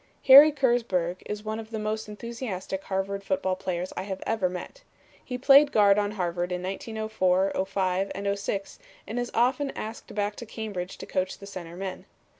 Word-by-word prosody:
Harry 285 +3 +10
Kersburg 235 - +1
is 210 0 -5
one 215 +1 -3
of 220 -1 -8
the 225 - -4
most 215 0 -3
enthusiastic 210 -4 -5
Harvard 195 +1 -2
football 190 -1 0
players 185 -1 -4
I - - -2
have 190 0 -5
ever 210 -5 +1
met. 180 - -8 0.4
He 250 - -4
played 275 +3 +6
guard 205 -1 +5
on 205 0 -1
Harvard 175 -2 -2
in 180 0 -3
1904, 195 -1 0 0.2
'05 190 0 0
and 200 +1 -1
'06 195 0 -4 0.3
and 225 +4 -3
is 245 0 -2
often 255 +4 +2
asked 220 -1 -7
back 205 0 -1
to 235 - -7
Cambridge 200 -5 -5
to - - -8
coach 185 0 -2
the 200 - -11
center 175 -4 -8
men. 190 0 -6
200 Hz, 180 wpm, -27 LUFS, 185-225 Hz, 0.4 s, Harry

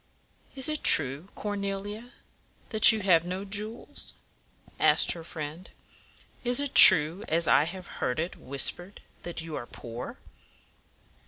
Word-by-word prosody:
"Is 265 -1 -3
it 305 -1 -5
true, 145 +4 +3
Cor 205 -1 -7
ne 200 -1 -6
li 200 +1 -10
a, 240 +2 -18 0.6
that 220 0 +6
you 220 -1 -6
have 175 -4 0
no 185 +3 -8
jewels?" 210 +3 -8 0.6
asked - - +2
her 170 - -6
friend. 160 +2 -10 0.7
"Is 245 +1 -2
it 285 -1 -5
true, 170 +2 +8
as 165 +1 -3
I 145 - +1
have 180 +2 -11 0.2
heard 125 - -4
it 165 +3 -6
whis 135 +1 +1
pered, 180 +3 -17 0.2
that 175 -1 -9
you 160 -2 -10
are 120 - -9
poor?" 120 0 -12
180 Hz, 155 wpm, -24 LUFS, 160-210 Hz, 0.7 s, true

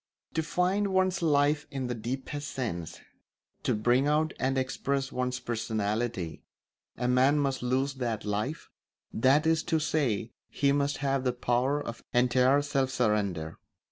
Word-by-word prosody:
To 160 - +1
find 180 +5 +1
one's 185 -1 +1
life 150 -1 +2
in 135 -3 -4
the 125 - -2
deepest 130 +5 -4
sense, 85 -11 -4 0.6
to - - +1
bring 120 +6 +2
out 155 +1 +2
and 135 +1 0
express 135 +1 -1
one's 125 0 -2
personality, 110 -5 -2 0.6
a 125 - -1
man 130 +4 +4
must 135 -2 0
lose 130 +3 0
that 120 -5 -3
life; 105 +9 -3 0.4
that 135 +7 +3
is 160 -1 +3
to 165 - +1
say, 135 -8 0 0.2
he 140 -1 +1
must 140 0 +1
have 135 -1 +1
the 125 -1 +1
power 125 +4 +1
of 120 -5 -7
entire 125 +3 +4
self 135 -2 0
surrender. 105 -10 -1
130 Hz, 145 wpm, -29 LUFS, 120-145 Hz, 0.6 s, man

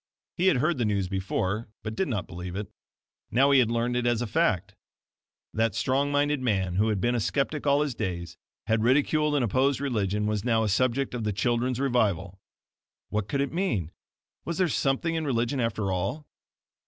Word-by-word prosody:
He 185 +1 +1
had 160 - +4
heard 155 +2 +1
the - - +2
news 100 -3 0
before, 95 +3 -2
but 110 0 -4
did 190 - -1
not 105 -8 -2
believe 90 +1 -7
it. 100 +1 -5 0.6
Now 135 +5 +4
he 140 - +6
had 120 -3 +3
learned 120 +1 0
it 120 0 +1
as 120 -2 +2
a - - -2
fact. 105 - 0 0.8
That 110 -2 +1
strong 140 +2 +1
minded 145 -1 +1
man 95 -7 0
who 105 +3 +3
had 105 -3 0
been 120 +5 +1
a 120 - +1
skeptic 145 +6 -1
all 140 +1 +4
his 150 -3 -1
days, 85 -6 -4 0.3
had 110 0 +1
ridiculed 150 +5 +2
and 135 -4 +2
opposed 130 +5 +1
religion, 105 -7 -1
was 105 -1 -1
now 115 -2 +2
a 110 - 0
subject 130 +6 +1
of 120 -2 -3
"the 105 - 0
children's 120 +4 0
revival." 100 -8 0 0.7
What 105 -2 -2
could 140 +3 -1
it 140 - -2
mean? 115 - -1 0.5
Was 170 - -4
there 185 -1 +3
something 140 +4 0
in 160 -1 -1
religion 125 -1 0
after 110 -4 -1
all? 110 - -2
120 Hz, 195 wpm, -27 LUFS, 105-140 Hz, 0.8 s, he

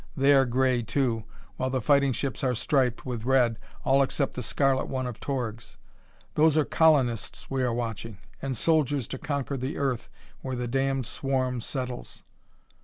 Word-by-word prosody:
They 140 +1 +5
are 135 -2 +5
gray, 130 0 +2
too, 115 -2 0 0.3
while 130 - -1
the 130 0 0
fighting 140 +2 +3
ships 130 0 -3
are 125 -2 +2
striped 125 0 +1
with 120 -4 -4
red, 125 -3 +3 0.3
all 135 +1 +4
except 135 +1 0
the 125 - -4
scarlet 135 +2 +1
one 130 -1 -2
of 125 -2 -5
Torg's. 120 -5 -4 0.6
Those 155 0 +4
are 155 - +4
colonists 135 -10 +2
we 135 -1 0
are 125 -1 +1
watching, 115 -2 -4 0.2
and 135 -3 -2
soldiers 145 -4 +2
to 130 - -5
conquer 140 -2 -2
the 130 +3 -3
Earth 135 -4 -1 0.3
where 130 -1 -3
the 125 0 -3
damned 135 +1 0
swarm 130 -1 -1
settles." 125 0 -5
130 Hz, 170 wpm, -27 LUFS, 120-135 Hz, 0.6 s, They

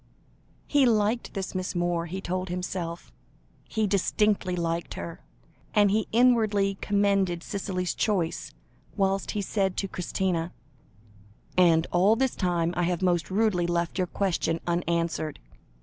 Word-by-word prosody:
He 285 -3 +4
liked 220 +1 +1
this 195 -1 -3
Miss 185 0 -3
Moore, 175 -1 0
he 190 +3 -5
told 185 0 -3
himself, 175 - -4 0.6
he 220 - 0
distinctly 200 -1 +1
liked 170 -1 -2
her, 170 - -7 0.5
and 205 -2 +5
he 215 +1 +1
inwardly 215 -5 +3
commended 200 -4 +1
Cicely's 185 -3 -2
choice, 185 -6 -1 0.5
whilst 195 -1 +1
he 205 - 0
said 195 -1 -1
to 195 - -1
Christina 180 -2 -2 1.0
"And 170 -2 +5
all 190 +5 +4
this 265 +1 0
time 175 -2 0
I 175 - 0
have 180 +1 -1
most 175 -5 +1
rudely 190 -4 +1
left 175 +2 -1
your 180 - +1
question 170 -3 0
unanswered. 170 -3 -1
185 Hz, 135 wpm, -27 LUFS, 175-200 Hz, 1.0 s, and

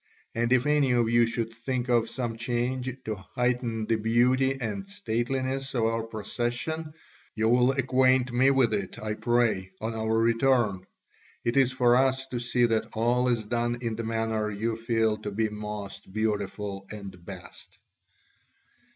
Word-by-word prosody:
And 120 +1 0
if 130 -1 +4
any 150 -3 +3
of 120 -2 +2
you 120 0 +5
should 115 0 -3
think 125 +2 -3
of 120 -2 +2
some 120 -2 -3
change 125 +2 -1 0.2
to 110 - -1 0.2
heighten 125 -3 0
the 115 +1 +1
beauty 125 +4 +2
and 105 -5 -4
stateliness 130 +6 -2
of 120 - +1
our 115 0 +1
procession, 120 +8 -3 0.4
you 110 0 +1
will 125 +3 +4
acquaint 130 -1 +2
me 130 +3 +4
with 130 -5 +3
it, 100 -3 -3
I 110 0 -3
pray, 115 -5 +1
on 110 +1 -3
our 110 0 0
return; 115 -4 +2 0.6
it 120 - +1
is 135 -2 +4
for 125 -2 +4
us 130 +1 +2
to 120 - -3
see 120 0 +2
that 115 -2 0
all 120 +3 +2
is 115 -3 +1
done 120 +2 -1
in 115 -2 -2
the 115 - -4
manner 110 -1 -1
you 110 +2 -2
feel 115 -1 +1
to 105 - -5
be 110 +2 0
most 105 -2 -7
beautiful 100 -2 -2
and 100 -4 -9
best." 90 -1 -10
115 Hz, 160 wpm, -27 LUFS, 110-125 Hz, 0.6 s, you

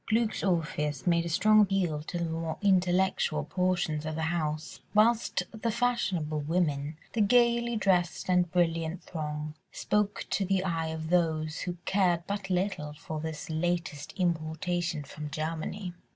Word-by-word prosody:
Glück's 220 -2 +1
Orpheus 150 -6 0
made 170 -1 +3
a - - -2
strong 215 +6 +5
appeal 185 -7 +1
to 170 +3 -5
the 170 - -1
more 165 0 -3
intellectual 185 -4 +2
portions 180 -2 0
of 155 0 -3
the 160 - -2
house, 155 -2 -3 0.2
whilst 225 +2 +3
the 225 +1 -2
fashionable 210 -10 0
women, 150 -2 0 0.2
the 230 - +1
gaily 235 +2 +4
dressed 185 -5 +1
and 180 -2 +3
brilliant 165 -1 0
throng, 150 -2 -4 0.2
spoke 210 -1 0
to 200 - +1
the 190 0 +1
eye 165 -3 -1
of 160 0 -4
those 160 -3 +1
who 175 0 -4
cared 180 -4 +2
but 200 -1 -4
little 180 -5 -1
for 155 +1 -6
this 155 -1 -5
"latest 165 -2 -2
importation 170 -1 -1
from 150 +1 -7
Germany." 165 +5 -4
175 Hz, 150 wpm, -29 LUFS, 155-195 Hz, 0.2 s, strong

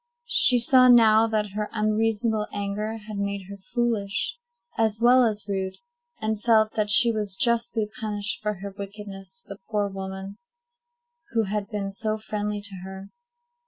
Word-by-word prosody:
She 250 - +5
saw 255 +1 +5
now 225 -2 +6
that 215 -2 -1
her 210 +1 -3
unreasonable 215 0 0
anger 205 +2 -3
had 215 -2 -6
made 200 -1 -3
her 200 - -8
foolish 215 - -2 0.4
as 220 -1 0
well 250 +2 +6
as 215 -3 0
rude, 190 -1 -3 0.4
and 215 -1 -2
felt 220 -2 +3
that 210 -1 -1
she 235 +3 +6
was 210 -3 -3
justly 235 -1 0
punished 210 0 -3
for 210 -1 -2
her 200 +2 -7
wickedness 200 -1 -8
to 190 0 -23
the 200 0 -9
poor 205 -2 0
woman 195 +1 -7 0.9
who 225 -1 +2
had 205 0 -3
been 200 -3 -3
so 215 +2 -2
friendly 210 -1 -4
to 200 -1 -3
her. 190 +1 -9
210 Hz, 160 wpm, -25 LUFS, 200-225 Hz, 0.9 s, now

